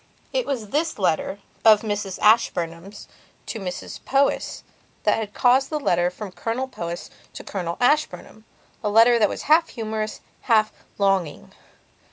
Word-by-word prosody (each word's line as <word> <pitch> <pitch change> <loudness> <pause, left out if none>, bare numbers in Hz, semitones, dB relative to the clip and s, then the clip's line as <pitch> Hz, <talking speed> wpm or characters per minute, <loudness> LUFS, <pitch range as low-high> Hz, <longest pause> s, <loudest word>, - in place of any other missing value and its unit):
It - - 0
was 235 -7 -3
this 315 +5 -1
letter 185 0 0 0.3
of 215 -2 +7
Mrs 205 -3 -3
Ashburnham's 185 -3 +1 0.4
to 225 - -5
Mrs 180 -2 -6
Powys 275 +1 0 0.4
that - - +3
had 215 -2 -5
caused 255 +2 +3
the 305 - -2
letter 175 -10 +1
from 195 +2 -8
Colonel 230 +7 -3
Powys 170 -8 -6 0.2
to - - -9
Colonel 175 -4 -4
Ashburnhama 250 -4 0 0.4
letter 230 +3 +5
that 210 - +4
was - - -5
half 325 +2 +4
humorous, 215 -2 -4 0.3
half 215 -2 +4 0.2
longing. 190 - 0
215 Hz, 140 wpm, -23 LUFS, 190-245 Hz, 0.4 s, of